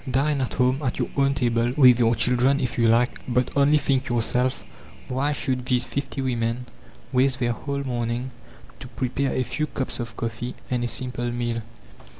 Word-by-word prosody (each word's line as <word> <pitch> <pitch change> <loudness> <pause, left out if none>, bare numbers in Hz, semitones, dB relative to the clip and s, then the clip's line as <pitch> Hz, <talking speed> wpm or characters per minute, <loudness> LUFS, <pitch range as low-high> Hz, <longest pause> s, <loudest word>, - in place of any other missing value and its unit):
Dine 140 +2 +1
at 130 - -2
home, 130 +2 +2
at 130 -4 -2
your - - -1
own 140 0 +2
table, 120 -2 +1
with 125 -4 +7
your 115 -1 +4
children, 125 +4 +2
if 125 -3 -2
you 115 -1 +3
like; 115 +2 +2
but 125 0 +1
only 140 +2 +5
think 135 -3 0
yourself, 125 +2 0 0.4
why 135 +3 0
should 130 -3 -1
these 125 -1 +3
fifty 135 +2 -3
women 120 -1 -1 0.5
waste 130 0 +3
their 120 -1 +1
whole 140 +4 -4
morning 120 0 -2 0.5
to - - -8
prepare 130 +2 -2
a 130 - 0
few 150 +4 -2
cups 130 -3 -3
of 115 -1 -6
coffee 115 +1 -4 0.2
and 125 -1 0
a - - 0
simple 120 0 -4
meal! 120 -1 -2
125 Hz, 180 wpm, -24 LUFS, 120-135 Hz, 0.5 s, with